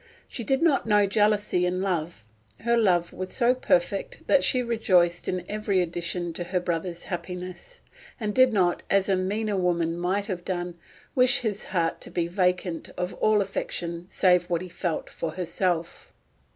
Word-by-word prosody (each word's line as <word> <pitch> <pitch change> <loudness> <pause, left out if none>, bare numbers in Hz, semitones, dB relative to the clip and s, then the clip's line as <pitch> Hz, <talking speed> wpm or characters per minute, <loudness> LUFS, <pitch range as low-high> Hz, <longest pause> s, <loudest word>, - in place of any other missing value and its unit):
She 235 - -5
did 270 +7 +1
not 295 -8 +3
know 210 -1 +4
jealousy 205 -2 +2
in 180 +1 0
love; 170 - -2 0.4
her 235 0 +2
love 180 -7 +2
was 185 +1 -5
so 245 0 +3
perfect 195 -6 0
that 280 - +4
she 250 -1 +3
rejoiced 185 -7 +2
in 180 -1 -2
every 210 -2 0
addition 175 0 -2
to 175 - -4
her 180 +1 0
brother's 170 0 -3
happiness, 180 - -7 0.4
and 210 -2 -2
did 255 +1 +5
not, 180 -5 +2
as 195 -1 +3
a 195 - +4
meaner 205 +3 -1
woman 170 -2 +1
might 190 +3 0
have 185 -4 -4
done, 175 -1 -3 0.4
wish 255 0 +4
his 210 -4 -3
heart 170 -3 -1
to - - -7
be 170 - -1
vacant 180 -1 -1
of 180 +1 -2
all 215 -1 +3
affection 175 -3 -4
save 180 -2 +3
what 175 0 0
he 185 - -8
felt 170 -1 -3
for 160 -2 -5
herself. 175 -1 -2
185 Hz, 170 wpm, -26 LUFS, 175-210 Hz, 0.4 s, did